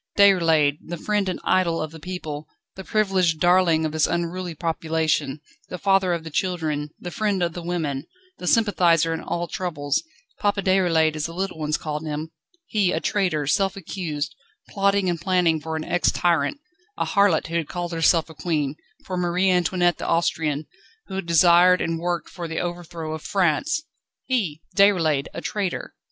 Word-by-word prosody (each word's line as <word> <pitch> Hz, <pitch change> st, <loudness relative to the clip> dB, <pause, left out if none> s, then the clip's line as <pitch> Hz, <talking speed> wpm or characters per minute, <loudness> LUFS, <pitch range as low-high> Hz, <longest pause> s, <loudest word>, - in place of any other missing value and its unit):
Déroulède, 165 Hz, -7 st, +4 dB
the 175 Hz, +1 st, -6 dB
friend 205 Hz, +2 st, 0 dB
and 180 Hz, -, -3 dB
idol 170 Hz, -3 st, +2 dB
of 155 Hz, -1 st, -3 dB
the 160 Hz, -, -11 dB
people, 155 Hz, -3 st, -6 dB, 0.3 s
the 190 Hz, -, -8 dB
privileged 190 Hz, -6 st, +1 dB
darling 175 Hz, -2 st, +4 dB
of 155 Hz, -, -1 dB
this 155 Hz, -1 st, +2 dB
unruly 175 Hz, 0 st, -3 dB
population, 160 Hz, -3 st, -1 dB, 0.3 s
the 180 Hz, -, -5 dB
father 195 Hz, -1 st, +2 dB
of 170 Hz, -2 st, -1 dB
the 160 Hz, -, -8 dB
children, 155 Hz, -4 st, -1 dB
the 175 Hz, -, -6 dB
friend 200 Hz, -2 st, 0 dB
of 170 Hz, -1 st, -1 dB
the 175 Hz, -, -6 dB
women, 160 Hz, -5 st, -2 dB, 0.3 s
the 180 Hz, -, -5 dB
sympathiser 175 Hz, -7 st, +3 dB
in 160 Hz, -, -4 dB
all 175 Hz, 0 st, -3 dB
troubles, 150 Hz, -5 st, -2 dB, 0.4 s
Papa 205 Hz, -3 st, 0 dB
Déroulède 170 Hz, -5 st, +3 dB
as 155 Hz, 0 st, -2 dB
the 165 Hz, -, -9 dB
little 190 Hz, -3 st, -3 dB
ones 150 Hz, 0 st, 0 dB
called 150 Hz, 0 st, -4 dB
him 155 Hz, +1 st, -4 dB, 0.3 s
he 205 Hz, -, +1 dB
a 160 Hz, -, 0 dB
traitor, 180 Hz, -6 st, 0 dB
self 195 Hz, +5 st, +1 dB
accused, 155 Hz, -5 st, -4 dB, 0.4 s
plotting 200 Hz, -1 st, +1 dB
and 170 Hz, -2 st, -1 dB
planning 170 Hz, -3 st, +2 dB
for 160 Hz, +1 st, -4 dB
an 160 Hz, -, -3 dB
ex 175 Hz, 0 st, +2 dB
tyrant, 170 Hz, -, +1 dB, 0.4 s
a -, -, 0 dB
harlot 200 Hz, -5 st, +3 dB
who 165 Hz, -, -5 dB
had 165 Hz, -3 st, -2 dB
called 175 Hz, -1 st, -4 dB
herself 165 Hz, 0 st, +3 dB
a 160 Hz, -, -12 dB
queen, 150 Hz, -3 st, -1 dB, 0.3 s
for 185 Hz, -, -4 dB
Marie 180 Hz, +2 st, +2 dB
Antoinette 175 Hz, -1 st, +2 dB
the -, -, -4 dB
Austrian, 160 Hz, -3 st, 0 dB, 0.4 s
who -, -, -7 dB
had 190 Hz, -2 st, -4 dB
desired 175 Hz, +2 st, +6 dB
and 165 Hz, 0 st, -1 dB
worked 175 Hz, 0 st, -2 dB
for 175 Hz, -2 st, -7 dB
the 160 Hz, 0 st, -5 dB
overthrow 175 Hz, -2 st, -5 dB
of 155 Hz, -, -5 dB
France! 200 Hz, -, +1 dB, 0.4 s
He, 185 Hz, -, -1 dB
Déroulède, 165 Hz, -8 st, +3 dB
a -, -, -4 dB
traitor! 200 Hz, -4 st, -3 dB
170 Hz, 175 wpm, -23 LUFS, 160-185 Hz, 0.4 s, desired